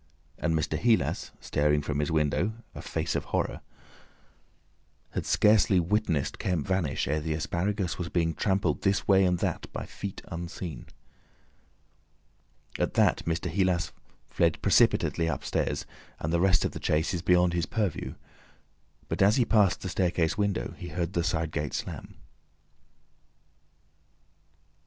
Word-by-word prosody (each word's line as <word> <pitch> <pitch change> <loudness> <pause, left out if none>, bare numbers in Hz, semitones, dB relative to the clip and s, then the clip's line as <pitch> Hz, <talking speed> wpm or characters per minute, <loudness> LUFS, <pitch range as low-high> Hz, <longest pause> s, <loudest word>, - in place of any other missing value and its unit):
And 80 -1 +1
Mr. 80 0 -1
Heelas 115 +1 +1
staring 75 0 +1
from 75 -1 -2
his 75 +3 0
window—a 80 +9 -1
face - - -2
of - - -1
horror—had - - -8
scarcely 100 -4 +4
witnessed 90 -4 0
Kemp 90 -6 -1
vanish, 95 -7 0
ere 75 +3 +1
the 80 0 -2
asparagus 90 +4 -2
was 90 -1 -3
being 85 -2 +1
trampled 95 -5 0
this 100 -1 +1
way 95 -1 +5
and 90 -1 +2
that - - -3
by - - -5
feet 100 -1 -7
unseen. 85 -4 -6 1.9
At - - 0
that - - +3
Mr. 85 +2 -1
Heelas 90 -3 +1 0.4
fled - - +1
precipitately 85 - +3
upstairs, 80 -5 -1 0.3
and 80 +2 -2
the 85 - +2
rest 95 -1 +4
of - - -1
the - - -7
chase 80 +4 +1
is 85 - -2
beyond 90 0 +3
his 85 -2 0
purview. 105 -7 -2 0.9
But - - -2
as 100 +3 +6
he 125 - +3
passed 105 -5 +3
the 95 - -4
staircase 90 -2 +1
window, 100 - -1
he 90 - -6
heard 90 +1 -3
the 85 - +1
side 80 -1 -1
gate 75 -1 -3
slam. - - -6
85 Hz, 140 wpm, -28 LUFS, 80-95 Hz, 1.9 s, as